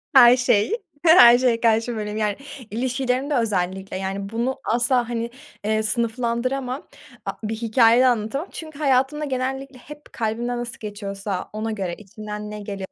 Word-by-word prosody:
her 245 -1 +9
şey. 250 - +2 0.3
Her 245 -8 +8
şeye 245 -2 +2
karşı 230 +1 +2
böyleyim, 210 -1 -4
yani. 210 -2 0 0.4
İlişkilerimde 255 +4 -1
özellikle, 190 -4 -1
yani, 195 +1 -4
bunu 235 +4 -2
asla, 240 +1 +1
hani, 235 -1 -2 0.4
eee, 215 0 +1
sınıflandıramam. 245 +4 -1 0.4
A - - -1
bir 220 +1 -2
hikâye 230 +1 +4
de 260 - +5
anlatamam 245 - 0
çünkü 310 -3 -9
hayatımda 280 +1 +2
genellikle 265 0 -3
hep 295 +3 -13
kalbimden 235 +2 -2
nasıl 240 +1 -5
geçiyorsa 200 -2 -5
ona 220 +1 -3
göre, 190 -5 -3
içimden 210 0 -8
ne 210 - -6
geliyorsa 200 -2 -6
235 Hz, 150 wpm, -23 LUFS, 210-255 Hz, 0.4 s, her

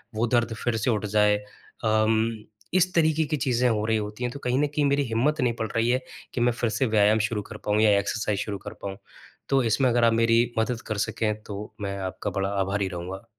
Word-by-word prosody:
वो 115 +2 +1
दर्द 120 -1 +1
फिर 120 -2 0
से 110 +4 0
उठ 105 -1 -1
जाए। 105 0 +3 0.5
अम, 110 0 +1 0.3
इस 185 0 +3
तरीके 160 -1 +3
की 150 0 -1
चीज़ें 125 -2 +1
हो 110 -1 0
रही 110 - +2
होती 105 +3 -5
हैं, 120 - -2
तो 140 - -7
कहीं 125 +1 0
न 150 - +2
कहीं 145 0 0
मेरी 140 0 +2
हिम्मत 130 +7 +1
नहीं 120 -2 +2
पड़ 110 - -1
रही 115 +1 +2
है 130 +1 +2 0.3
कि 120 - 0
मैं 120 0 +4
फिर 120 -1 -1
से 130 +4 0
व्यायाम 110 0 +4
शुरू 105 -3 -2
कर 105 - -6
पाऊँ 105 0 +2
या 110 -1 +5
एक्सरसाइज़ 105 -1 -1
शुरू 100 -1 -3
कर - - -5
पाऊँ, 95 -1 -5 0.5
तो 135 -2 +3
इसमें 125 +3 +2
अगर 120 0 +2
आप 115 - +4
मेरी 115 +1 +4 0.2
मदद 120 +1 -1
कर 110 - -2
सकें, 110 -2 -1
तो 105 +1 -7
मैं 100 -1 -3
आपका 95 +2 -4
बड़ा 95 0 0
आभारी 95 0 0
रहूँगा। 90 +2 -6
115 Hz, 235 wpm, -26 LUFS, 105-125 Hz, 0.5 s, या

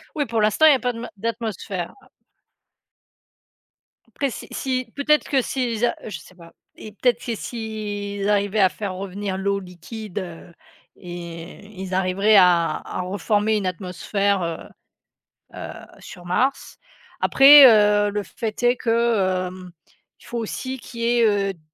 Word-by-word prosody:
Oui, 290 -2 0
pour 225 -1 -1
l'instant 215 +9 +3
il 310 - +9
y - - +5
a - - -2
pas 250 -1 -1
d 230 - -8
ma 240 - -6
d'atmosphère 205 -5 -4 2.3
après 275 -3 +1
si - - -8
si 255 -3 -3
peut-être 300 +1 +2
que 270 -2 +3
s'ils 240 -3 -1
a - - 0
je 215 - -6
sais 185 - -17
pas 170 -2 -15 0.2
et 215 - -10
peut-être 240 +3 0
que 235 -2 -2
s'ils 205 -3 -5
arrivaient 205 0 +1
à 190 - +6
faire 190 0 -5
revenir 195 0 -4
l'eau 200 +1 -1
liquide, 190 +3 -8
heu 170 -1 -9 0.4
et 175 +1 -9 0.2
ils 190 -1 -6
arriveraient 190 +3 +2
à 175 -3 +4
à - - -6
reformer 205 +3 0
une 200 -3 -1
atmosphère, 190 +2 -1
heu 170 -1 -3 1.0
heu, - - -7 0.3
sur 175 -2 -12
Mars, 255 +10 -1 0.4
après, 280 +1 +9
heu, 205 -2 +4
le 205 0 -2
fait 220 +5 -6
est 245 0 +3
que, 215 -6 +1
hem, 180 -1 -10 0.5
il - - -18
faut 240 - -5
aussi 255 +4 -4
qu'il 235 -1 -9
y - - 0
ait, 230 - +5 0.3
heu, - - -10
d 170 - -23
205 Hz, 160 wpm, -22 LUFS, 185-230 Hz, 2.3 s, il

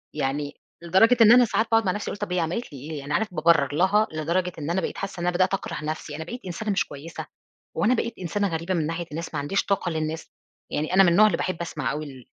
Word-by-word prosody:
يعني 145 0 -2 0.3
لدرجة 205 +8 +5
إن 225 0 +8
أنا 245 0 +8
ساعات 220 +1 0
باقعد 225 -1 +4
مع 185 - +2
نفسي 205 +2 -4
واقول 205 - -7
طَب 180 - -4
هي 180 - +1
عملت 170 +3 -3
لي 140 - -8
إيه؟ 150 +2 -6
يعني 145 +1 -5
عارف 210 +2 0
بابرّر 155 -4 +3
لها 195 +6 +3
لدرجة 170 +4 -1
إن 150 +2 -4
أنا 185 +2 +1
بقيت - - -4
حاسة 195 -2 -5
إن 175 - -1
أنا 180 - 0
بدأت 185 +1 +2
أكره 190 -5 -3
نفسي، 155 -1 -4
أنا 160 - -5
بقيت 245 +9 -7
إنسانة 205 +4 -3
مش 195 - +1
كويسة؟ 150 +4 -8 0.5
هو - - +1
أنا 245 - +4
بقيت 235 -1 -1
إنسانة 200 +3 -1
غريبة 165 +2 -2
من 160 -3 0
ناحية 165 +1 -3
الناس 165 +2 -5
ما - - -1
عنديش 145 +8 -1
طاقة 195 -3 0
للناس؟ 160 0 -4 0.4
يعني 155 +4 -2
أنا 195 - +7
من 175 - +5
النوع 210 +5 +6
اللي 190 - 0
باحب 185 -2 -3
أسمع 170 - -3
أوي 155 +1 -4
ال 130 -4 -11
170 Hz, 260 wpm, -25 LUFS, 155-195 Hz, 0.5 s, إن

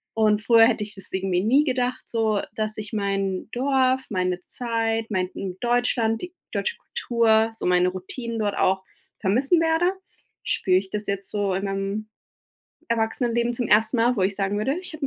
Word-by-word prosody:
Und 215 -1 +3
früher 230 -1 +7
hätte 230 -3 0
ich 205 0 -6
das 195 - -13
irgendwie 190 -1 0
nie 255 +9 +4
gedacht, 255 -3 -1
so, 220 -3 0 0.2
dass 215 0 -3
ich 215 0 -6
mein 195 -2 -1
Dorf, 260 0 +2
meine 180 -2 -1
Zeit, 225 -2 -1
mein 185 -3 0
in 185 -2 -5
Deutschland, 240 -2 +1
die 360 - -7 0.2
deutsche 475 - -1
Kultur, 225 -2 +2
so - - -6
meine 180 0 +4
Routinen 225 +6 -6
dort 205 -2 -1
auch 190 0 +1 0.4
vermissen 260 - +2
werde, 330 +2 +2 0.5
spüre 185 -1 +2
ich 190 0 -3
das 210 0 -4
jetzt 200 0 -3
so 200 -2 0
in 195 - -2
meinem 195 +2 -3 0.8
Erwachsenenleben 235 +1 0
zum 240 -1 -2
1. 220 +3 +3
Mal, 240 +2 +3
wo 200 - -1
ich 190 +2 +1
sagen 195 +1 -1
würde, 270 +8 0
ich 365 -3 -6
habe 315 - -8
220 Hz, 180 wpm, -24 LUFS, 195-240 Hz, 0.8 s, früher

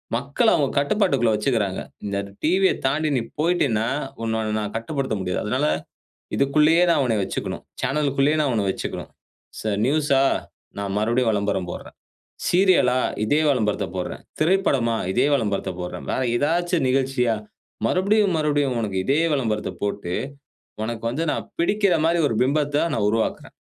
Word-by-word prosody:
மக்கள 140 - +1
அவுங்க 140 -3 0
கட்டுப்பாட்டுக்குள்ள 140 - +2
வைச்சிக்குறாங்க. 105 -4 0 0.3
இந்த 100 -1 -2 0.3
டிவிய 185 +4 +3
தாண்டி, 150 +4 +1
நீ 125 - +1 0.2
போய்ட்டேன்னா 140 -10 +1 0.4
உன்ன, 110 0 -1
நான் 105 -1 -3
கட்டுப்படுத்த 130 +1 -2
முடியாது. 90 -1 -2
அதனால - - 0 0.7
இதுக்குள்ளயே, 150 +5 +4
நான் 165 - +3
உன்ன 115 -3 +1
வச்சிக்கணும். 95 - -4 0.2
சேனலுக்குள்ளயே, 140 +2 +1
நான் 145 -3 +1
உன்ன 105 -3 0
வைச்சுக்கணும். - - -4 0.5
ச - - -8 0.2
நியூஸ்‌ஸா 140 -1 +2 0.6
நான் 100 -1 -3
மறுபடியும் 115 +3 +1
விளம்பரம் 100 -3 -1
போடுறேன். - - -9 0.5
சீரியலா 175 -9 +4 0.3
இதே 145 +8 +2
விளம்பரத்தைப் 105 -7 0
போடுறேன். 90 -1 -5 0.2
திரைப்படமா, 145 -10 +2 0.2
இதே 130 +6 +3
விளம்பரத்தைப் 100 -6 -2
போடுறேன். 90 - -6
வேற 130 - -1
ஏதாச்சும் 170 +3 +1
நிகழ்ச்சியா, 130 -3 +1 0.5
மறுபடியும், 200 0 +2
மறுபடியும். 145 -4 +1
உனக்கு 100 -3 -3
இதே 145 +4 +2
விளம்பரத்த 110 -6 -1
போட்டு, 100 -3 -2 0.7
உனக்கு 115 0 -4
வந்து 155 +7 -2
நான் - - -4
பிடிக்கிற 200 +1 +2
மாதிரி 170 +1 +2
ஒரு 115 - -2
பிம்பத்த 145 +2 +1
நான் 105 -7 +1
உருவாக்குறேன். 110 +1 -1
135 Hz, 135 wpm, -23 LUFS, 110-155 Hz, 0.7 s, இதுக்குள்ளயே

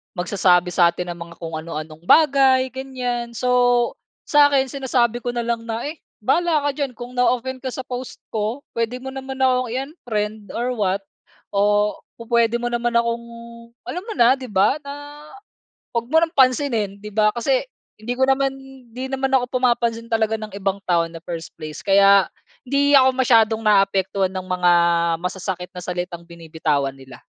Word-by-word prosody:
magsasabi 180 -1 +2
sa 175 0 +5
atin 175 +1 -3
ng 170 - -9
mga 170 - -13
kung 160 -1 -4
ano-anong 155 +1 -8
bagay, 265 -4 +5
ganyan. 250 -3 -4
So 245 0 +2 0.3
sa'kin 285 -3 +4
sinasabi 245 -3 0
ko 245 0 -4
na 235 - -1
lang 230 0 -3
na, 225 +1 -3
eh, 315 - -14 0.2
"Bahala 315 +3 +2
ka 290 - +1
diyan 275 -3 -4
kung 240 +1 -8
na-offend 255 +1 +1
ka 260 - -6
sa 260 +1 -5
post 250 0 -7
ko. 220 +5 -2
Puwede 230 +1 -2
mo 265 - -5
naman 265 0 -6
ako 255 -1 +2
i-unfriend 225 - -4
or 245 +2 -1
what 200 -4 -1 0.5
o 205 +1 +2 0.2
pu-puwede 235 0 +1
mo 240 0 -2
naman 240 0 -1
akong 235 0 +1 0.6
alam 360 - -5
mo 440 - -4
na, 250 +3 +4
'di 255 - -7
ba? 210 +8 +2
Na 290 +1 -9 0.8
huwag 235 0 -1
mo 320 - +5
nang 325 - -1
pansinin, 255 -6 +2
'di 210 +1 -9
ba?" 215 0 +3
Kasi - - +1 0.3
hindi 230 +3 -4
ko 265 0 +3
naman 270 0 +2 0.4
'di 260 +1 -5
naman 270 0 -1
ako 255 0 +1
pumapansin 235 -2 +1
talaga 220 0 +1
ng 215 -2 -8
ibang 195 0 -2
tao 170 -2 +2
in 165 - -16
the 165 - -8
first 170 -1 -6
place, 155 -1 -8
kaya 195 0 +5 0.4
hindi 285 +2 +2
ako 260 0 +6
masiyadong 225 -3 +3
naaapektuhan 195 -2 +2
ng 185 0 -5
mga 180 -1 +3 0.5
masasakit 180 0 -4
na 180 - -7
salitang 175 -1 -4
binibitawan 160 -5 -2
nila. 130 -1 -13
235 Hz, 170 wpm, -21 LUFS, 195-260 Hz, 0.8 s, ako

